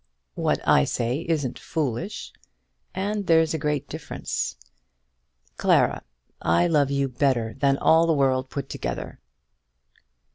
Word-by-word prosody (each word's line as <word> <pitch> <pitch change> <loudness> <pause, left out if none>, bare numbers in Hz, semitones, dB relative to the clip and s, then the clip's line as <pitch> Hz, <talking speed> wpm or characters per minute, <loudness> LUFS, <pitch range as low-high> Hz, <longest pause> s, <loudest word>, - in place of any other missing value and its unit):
"What - - -1
I 70 - +6
say 125 - -1
isn't 145 -7 -1
foolish; 160 - -3 0.6
and 200 +1 -2
there's 160 -1 +4
a 160 - -1
great 150 -2 -1
difference. - - -4 1.0
Clara, - - +3 0.4
I 85 - +3
love 150 -5 +2
you 140 -1 0
better 125 -3 0
than 135 0 +2
all 165 +3 +4
the 165 - +3
world 130 -2 +1
put 140 -2 -5
together." - - -5
140 Hz, 120 wpm, -25 LUFS, 130-160 Hz, 1.0 s, I